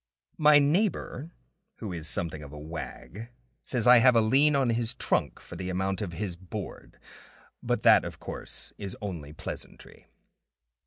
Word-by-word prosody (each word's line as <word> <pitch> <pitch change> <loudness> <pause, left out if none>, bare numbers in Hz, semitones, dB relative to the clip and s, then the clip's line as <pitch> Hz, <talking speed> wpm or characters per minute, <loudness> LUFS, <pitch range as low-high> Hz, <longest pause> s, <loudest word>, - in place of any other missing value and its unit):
My 150 -1 +7
neighbor 155 - 0 0.5
who 105 -5 -6
is 80 -2 +1
something 80 -3 +2
of 70 -1 -10
a 75 - -10
wag 85 +8 -8 0.3
says 120 -4 0
I 125 0 +8
have 125 0 +5
a - - +6
lien 135 +7 +3
on 135 -4 +2
his 115 +1 -1
trunk - - -1
for - - -12
the 95 0 -5
amount 95 +1 -2
of 90 -5 -4
his 95 0 -3
board; 90 0 -8 0.6
but - - -1
that, - - +6
of - - -7
course, - - -4
is 100 -1 -5
only 85 -8 -6
pleasantry. 80 +2 -10
105 Hz, 160 wpm, -28 LUFS, 85-125 Hz, 0.6 s, I